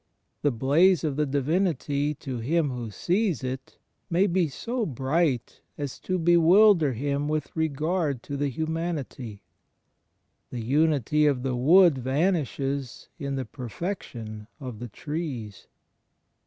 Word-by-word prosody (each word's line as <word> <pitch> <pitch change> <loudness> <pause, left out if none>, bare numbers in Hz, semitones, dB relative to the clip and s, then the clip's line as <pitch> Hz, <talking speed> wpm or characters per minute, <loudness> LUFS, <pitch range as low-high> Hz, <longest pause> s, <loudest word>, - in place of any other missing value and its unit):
The 145 - +3
blaze 145 +9 +3
of 150 -4 -1
the 150 0 0
Divinity 145 0 0
to 130 -3 -6
him 150 +4 +1
who 120 -3 -5
sees 175 - 0
it 130 +1 -5 0.3
may 175 +3 +3
be 180 -3 +2
so 235 - -3
bright 135 - -1 0.2
as 145 -3 -5
to 185 - -2
bewilder 170 -1 +5
him 140 +4 -1
with 155 -2 -2
regard 155 -2 -1
to 145 - -5
the 140 0 -1
hxmianity. 155 -8 -4 1.1
The 120 - -5
unity 150 +2 +2
of 130 -4 +1
the 130 -2 -1
wood 160 +3 +5
vanishes 140 -2 -1
in 140 -2 -3
the 130 -1 -3
perfection 115 - -6
of 125 -6 -7
the 120 0 -6
trees. 135 - -5
145 Hz, 130 wpm, -26 LUFS, 130-165 Hz, 1.1 s, bewilder